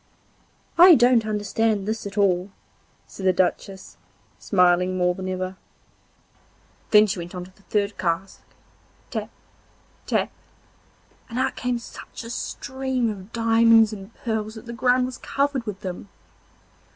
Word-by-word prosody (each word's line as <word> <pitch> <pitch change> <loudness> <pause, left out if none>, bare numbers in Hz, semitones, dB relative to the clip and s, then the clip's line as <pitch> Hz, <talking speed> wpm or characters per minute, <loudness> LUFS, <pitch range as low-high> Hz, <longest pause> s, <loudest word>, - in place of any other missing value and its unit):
'I 355 -1 +10
don't 240 -3 +4
understand 210 0 0
this 220 -1 -3
at 200 +1 -10
all,' 190 -2 +2 0.6
said 195 - -11
the 190 - +4
Duchess, 190 +1 -2 0.4
smiling 180 +1 +2
more 180 0 +2
than 185 +1 -7
before. 185 0 -4 1.3
Then 210 0 +7
she 195 -3 -3
went 175 +1 -7
on 180 - -5
to 185 +1 -18
the - - -24
third 205 0 -2
cask, 180 +2 -2 0.7
tap, - - -4 0.8
tap, - - 0 1.0
and 235 - -6
out 260 +1 0
came 250 -1 -1
such 235 - -10
a 230 - -7
stream 260 -2 -2
of 195 0 -10
diamonds 225 -1 +4
and 195 0 -9
pearls 220 -1 -3
that 220 - -10
the 235 - -7
ground 250 +1 +2
was 255 0 -7
covered 275 -4 -1
with 200 -2 -5
them. 185 +1 -6
210 Hz, 140 wpm, -24 LUFS, 190-235 Hz, 1.3 s, I